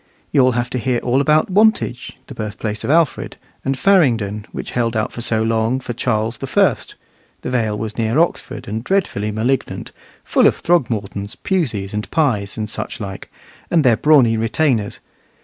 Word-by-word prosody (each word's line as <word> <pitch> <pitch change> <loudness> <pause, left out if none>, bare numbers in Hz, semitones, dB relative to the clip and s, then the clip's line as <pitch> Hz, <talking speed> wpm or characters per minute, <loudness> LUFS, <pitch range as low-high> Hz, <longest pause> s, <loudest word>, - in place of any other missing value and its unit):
You'll 130 -3 +4
have 120 +1 -2
to 125 - -1
hear 125 +1 0
all 125 +3 +1
about 155 +5 +2
Wantage, 205 - +1
the - - -10
birthplace 110 0 -5
of 115 - -3
Alfred, 160 -2 +1 0.3
and 135 0 -1
Farringdon, 115 - +2
which - - -6
held 115 -2 0
out 110 - -1
so 115 -2 -1
long 115 +3 +1
for 125 -2 -5
Charles 110 -1 -1
the - - -5
First - - +1 0.5
(the - - -3
Vale 110 -4 0
was 110 +1 -5
near 115 +3 +1
Oxford, 170 +2 -1
and 110 +2 -4
dreadfully 155 - 0
malignant 115 +5 -2 0.3
full - - +4
of - - +2
Throgmortons, 110 - 0
Puseys, 115 - -2
and 105 0 -3
Pyes, 110 -12 0
and 110 -1 -2
such 105 - -5
like; 95 -3 -7 0.4
and 165 -3 +3
their 120 -3 +5
brawny 130 -5 +4
retainers). 115 -1 0
115 Hz, 165 wpm, -19 LUFS, 110-135 Hz, 0.5 s, their